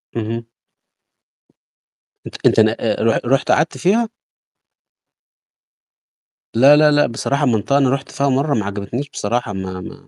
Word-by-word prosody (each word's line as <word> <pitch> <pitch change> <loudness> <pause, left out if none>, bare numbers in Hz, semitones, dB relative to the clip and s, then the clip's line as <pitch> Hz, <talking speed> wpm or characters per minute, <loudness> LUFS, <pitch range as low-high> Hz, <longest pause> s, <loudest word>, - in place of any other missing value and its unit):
اهم. 115 +1 -4 1.8
أنت - - -10
أنت - - +4
ن - - +5
آآ، - - -1
رح 115 - +2
رُحت 135 +4 +1
قعدت 155 +2 +1
فيها؟ 220 +5 +1 2.5
لا، 135 +5 +7
لا، 150 0 +5
لأ، 145 0 +3
بصراحة 140 +5 -2
منطقة 120 +3 +1
أنا 135 -2 +2
رُحت 135 +1 -3
فيها 140 0 -1
مرّة 140 +2 0
ما 105 -3 -1
عجبتنيش 100 +8 -5
بصراحة 115 0 -3
ما 95 -1 -6
ما - - -12
130 Hz, 135 wpm, -18 LUFS, 110-145 Hz, 2.5 s, لا